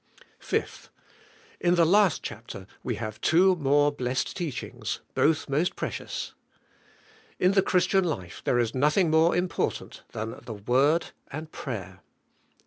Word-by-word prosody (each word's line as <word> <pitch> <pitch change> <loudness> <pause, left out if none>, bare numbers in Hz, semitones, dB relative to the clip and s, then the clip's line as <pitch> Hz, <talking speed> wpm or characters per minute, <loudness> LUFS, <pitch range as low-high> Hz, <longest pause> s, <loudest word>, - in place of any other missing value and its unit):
5. - - -3 0.7
In 175 0 +3
the 170 -1 +5
last 195 -2 +4
chapter 95 - -7 0.2
we - - -2
have 110 -1 -6
two 185 +3 +5
more 145 0 +3
blessed 130 -2 -2
teachings, 165 -8 -4
both 155 0 +2
most 150 +6 0
precious. - - -4 1.0
In 180 - +3
the 195 0 +4
Christian 190 +1 +2
life 95 - -4
there 120 - +2
is 120 -2 +1
nothing 150 +6 +3
more 160 +2 +4
important 180 0 -2
than 110 +1 -5
the 115 - -6
Word 135 +10 +2 0.2
3.nd 155 +2 -6
prayer. 100 -7 -6
150 Hz, 135 wpm, -27 LUFS, 125-175 Hz, 1.0 s, the